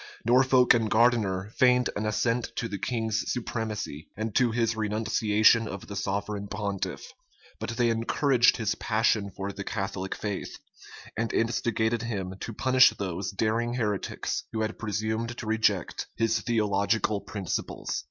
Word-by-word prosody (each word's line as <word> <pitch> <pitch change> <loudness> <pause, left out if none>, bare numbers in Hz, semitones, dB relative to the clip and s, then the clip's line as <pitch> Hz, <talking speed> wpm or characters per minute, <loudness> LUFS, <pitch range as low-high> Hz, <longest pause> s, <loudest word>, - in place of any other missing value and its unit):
Norfolk 125 +1 +5
and 115 -2 +1
Gardiner 105 -4 +2
feigned 125 -1 +4
an 105 +1 -1
assent 115 +2 0
to 115 - -2
the 100 -3 -5
king's 110 -1 -1
supremacy, 110 - -4
and 110 0 -3
to 125 -2 +3
his 115 0 0
renunciation 110 +1 +3
of 100 -2 -7
the 100 - -7
sovereign 100 +1 -2
pontiff; 100 -2 -4 0.5
but - - -4
they 120 -2 +3
encouraged 120 +2 +3
his 110 -3 0
passion 110 -2 +1
for 100 +1 -5
the 100 0 -6
Catholic 95 -1 -3
faith, 100 -2 -4 0.6
and 115 +1 -1
instigated 115 0 0
him 100 -5 -3
to - - -5
punish 130 +3 +5
those 95 -1 -4
daring 115 +4 0
heretics 105 -5 -2
who 110 - -2
had 110 0 -3
presumed 110 +2 -2
to - - -6
reject 110 -5 0
his 115 +1 +1
theological 105 -1 +1
principles. 100 -4 -4
110 Hz, 145 wpm, -27 LUFS, 100-115 Hz, 0.6 s, Norfolk